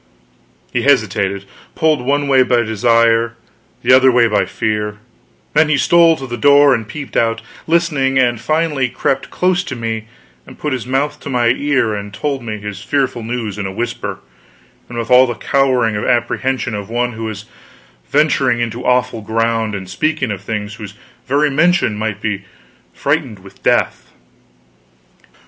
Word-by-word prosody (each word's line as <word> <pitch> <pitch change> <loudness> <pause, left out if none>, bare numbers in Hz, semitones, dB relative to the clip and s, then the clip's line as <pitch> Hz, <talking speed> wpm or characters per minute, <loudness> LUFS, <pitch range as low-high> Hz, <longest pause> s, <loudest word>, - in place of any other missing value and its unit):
He 120 - +1
hesitated, 100 -7 +1 0.3
pulled 155 -4 +2
one 145 +2 0
way 135 -1 +4
by 125 -2 +2
desire, 115 +1 +2 0.5
the - - +5
other 130 0 +6
way 120 -1 +4
by 105 -2 +1
fear; 105 -1 -2 0.6
then 160 -1 +4
he 150 - +3
stole 170 +3 +5
to 135 - -7
the 120 -2 -5
door 145 +1 +6
and 115 -4 -2
peeped 145 +4 -8
out, 115 0 +1 0.2
listening; 155 -5 +1
and 120 -3 +2
finally 155 -4 0
crept 130 +2 -2
close 180 0 +1
to 130 - -5
me 115 -2 -4 0.4
and - - -13
put 150 -3 -3
his 125 -2 -4
mouth 145 +3 -1
to - - -8
my 120 -3 +2
ear 130 -3 +1
and 100 -1 -6
told 140 +1 -2
me 110 -2 -4
his 105 -1 -7
fearful 130 -2 -1
news 110 -3 -4
in 100 - -2
a - - -5
whisper, 120 +4 -4 0.7
and 120 - -7
with 115 +1 -4
all 125 +1 +7
the 120 - -3
cowering 125 -2 +1
apprehension 120 +3 -1
of 105 -1 -5
one 120 +1 -1
who 110 +1 -6
was 110 -1 -6 0.6
venturing 140 -5 +2
upon 115 +1 -4
awful 125 -2 +1
ground 115 0 -1
and 95 -1 -6
speaking 140 - -1
of 100 -3 -5
things 105 0 -4
whose 105 -2 -9 0.3
very 145 +2 +2
mention 165 - +2
might 110 -1 -3
be 100 -2 -3 0.5
freighted 140 -7 -1
with 95 - -16
death. - - 0
120 Hz, 165 wpm, -17 LUFS, 110-140 Hz, 0.7 s, all